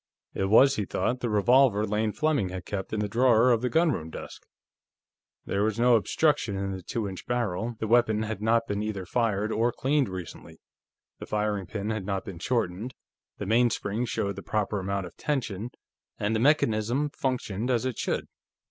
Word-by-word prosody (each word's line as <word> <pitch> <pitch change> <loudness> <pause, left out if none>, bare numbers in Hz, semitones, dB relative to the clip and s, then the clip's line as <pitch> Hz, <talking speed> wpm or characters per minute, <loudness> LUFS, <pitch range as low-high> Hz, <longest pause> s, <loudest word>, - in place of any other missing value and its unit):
It 95 - -1
was, 130 +7 +5
he 105 - -1
thought, 125 +6 -1
the 120 - -2
revolver 110 +1 +4
Lane 105 +1 0
Fleming 150 -8 0
had 90 -1 -6
kept 95 -2 -4
in 110 - -1
the 105 - -1
drawer 120 +2 +4
of 115 -2 +2
the 125 - 0
gunroom 155 - +1
desk. - - -9 1.0
There 100 - -1
was 110 +1 0
no 120 0 +5
obstruction 120 -1 +1
in 95 0 -2
the 95 -1 -5
two 105 +4 -3
inch 95 -2 -8
barrel, 115 -2 -1
the 110 - -3
weapon 110 -1 +3
had 110 -2 -4
not 115 +1 +2
been 105 -2 -2
either 105 -3 -3
fired 110 0 0
or 115 +2 +1
cleaned 135 -2 +1
recently, 90 -3 -8 0.6
the - - -8
firing 105 -3 -1
pin 105 +2 -3
had 110 -2 -3
not 100 -1 -2
been 90 -4 -8
shortened, 115 +1 -2 0.4
the 105 - -5
mainspring 115 0 +1
showed 100 -4 -2
the - - -5
proper 105 0 -1
amount 100 0 -2
of 90 - -11
tension, 120 -7 -2 0.5
and 105 +2 0
the - - +1
mechanism 130 0 +2
functioned 125 -5 -2
as 125 -1 +1
it 130 -3 -3
should. - - -1
110 Hz, 185 wpm, -27 LUFS, 100-120 Hz, 1.0 s, was